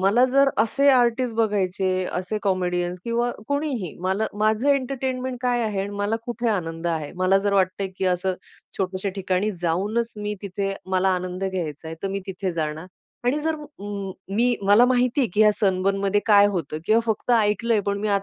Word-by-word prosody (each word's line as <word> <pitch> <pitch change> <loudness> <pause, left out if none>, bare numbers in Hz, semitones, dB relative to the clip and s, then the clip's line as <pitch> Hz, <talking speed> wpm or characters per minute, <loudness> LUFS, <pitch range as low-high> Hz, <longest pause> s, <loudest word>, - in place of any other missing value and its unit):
मला 205 +7 +4
जर 275 0 +5
असे 255 +6 +3
आर्टिस्ट 245 -2 +2
बघायचे 190 -4 0
असे 185 +4 -2
कॉमेडियन्स 180 -2 0
किंवा 235 +1 0 0.2
कोणीही 285 - -2
मला, 190 +4 0
माझं 215 +5 +1
एंटरटेनमेंट, 260 -2 -1
काय 245 -1 +1
आहे 210 -3 -1
आणि 200 +1 -3
मला 205 +2 0
कुठे 240 -1 -2
आनंद 165 -4 -2
आहे. 160 -3 -2
मला 185 +1 +3
जर 200 +1 0
वाटतंय 190 0 +1
की - - -1
असं 185 +1 0 0.4
छोट्याश्या 190 +1 -2
ठिकाणी 190 +1 0
जाऊनच 210 +8 0
मी 210 0 -3
तिथे 195 0 -2 0.2
मला 190 0 +2
आनंद 180 +1 -4
घ्यायचाय 160 -3 -4
तर 195 - -1
मी 195 +1 -3
तिथे 190 -1 -3
जाणार 160 +1 -3 0.4
आणि 255 +4 +2
जर 320 +1 0 0.2
उं, 200 -1 -5 0.2
मी 245 +2 +3
मला 205 +5 +6
माहिती 250 +2 +2
आहे 255 - +2
की 210 - +2
या 215 -1 +7
सनबर्न 195 -1 +1
मध्ये 200 +1 +2
काय 205 -2 +7
होतं 170 -7 -2
किंवा 220 +1 +4
फक्त 220 +2 -1
ऐकलंय 215 +1 +2
पण 200 0 0
मी 215 - -1
200 Hz, 180 wpm, -24 LUFS, 185-235 Hz, 0.4 s, या